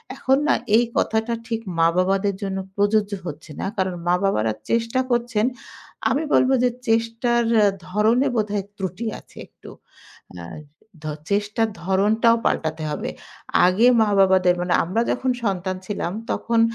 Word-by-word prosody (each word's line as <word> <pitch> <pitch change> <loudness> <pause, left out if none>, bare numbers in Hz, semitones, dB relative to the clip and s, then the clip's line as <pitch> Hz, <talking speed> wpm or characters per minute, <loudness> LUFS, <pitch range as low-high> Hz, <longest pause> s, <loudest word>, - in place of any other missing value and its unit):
এখন 270 -1 +2
না - - +4 0.2
এই 240 - +4
কথাটা 220 +1 0
ঠিক 225 -2 -2 0.2
মা-বাবাদের 185 +4 +2
জন্য 195 -1 -3 0.2
প্রযোজ্য 205 0 +1 0.2
হচ্ছে 155 +1 -8
না। - - -2
কারণ, 190 -1 0
মা-বাবারা 175 - +1 0.2
চেষ্টা 230 +2 +1
করছেন। 235 -2 +1 0.6
আমি 290 +4 0
বলবো 260 +1 +4
যে 250 - +4 0.2
চেষ্টার 230 +1 +1 0.2
এ - - +5 0.2
ধরণে 220 +7 +2
বোধহয় 210 -3 -1
ত্রুটি 190 +3 -4
আছে - - -22
একটু। - - -15 0.7
আ - - -8 0.6
ধো 155 - -3 0.2
চেষ্টার 210 +2 0 0.2
ধরনটাও 210 +5 +3
পাল্টাতে 160 0 -1
হবে। - - -4 0.6
আগে 190 +6 +3 0.2
মা-বাবাদের 190 -3 +4
মানে 175 0 0
আমরা 195 +7 0
যখন 255 +1 0
সন্তান 185 -2 -1
ছিলাম, 190 -4 -3 0.2
তখন 230 -1 0
205 Hz, 135 wpm, -22 LUFS, 185-230 Hz, 0.7 s, এ